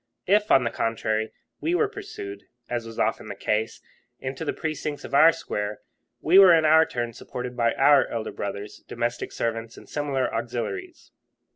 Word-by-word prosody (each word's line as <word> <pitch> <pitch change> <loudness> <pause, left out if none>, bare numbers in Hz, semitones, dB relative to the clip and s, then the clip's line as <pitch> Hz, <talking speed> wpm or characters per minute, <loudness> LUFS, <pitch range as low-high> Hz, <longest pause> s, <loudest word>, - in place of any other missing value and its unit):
If, 210 +2 +3
on 135 - +5
the 115 - -1
contrary, 110 -1 -1 0.3
we 335 +2 0
were 425 - +3
pursued, 390 - -8 0.2
as 120 -2 -3
was 115 - -10
often - - 0
the - - -6
case, 110 +1 -2 0.4
into 130 +3 -5
the 155 - -1
precincts 155 -2 -4
of - - -9
our 160 +4 +8
square, 105 -9 -4 0.4
we 180 +5 +6
were 185 -3 +9
in 160 -1 +3
our 160 +1 +6
turn 120 -1 -3
supported 125 +2 -7
by 115 -1 +1
our 140 0 +5
elder 115 -2 -4
brothers, 100 +1 -6
domestic 120 0 -3
servants, 115 0 -3
and - - -13
similar 140 -3 -1
auxiliaries. 120 - -4
125 Hz, 170 wpm, -25 LUFS, 115-160 Hz, 0.4 s, were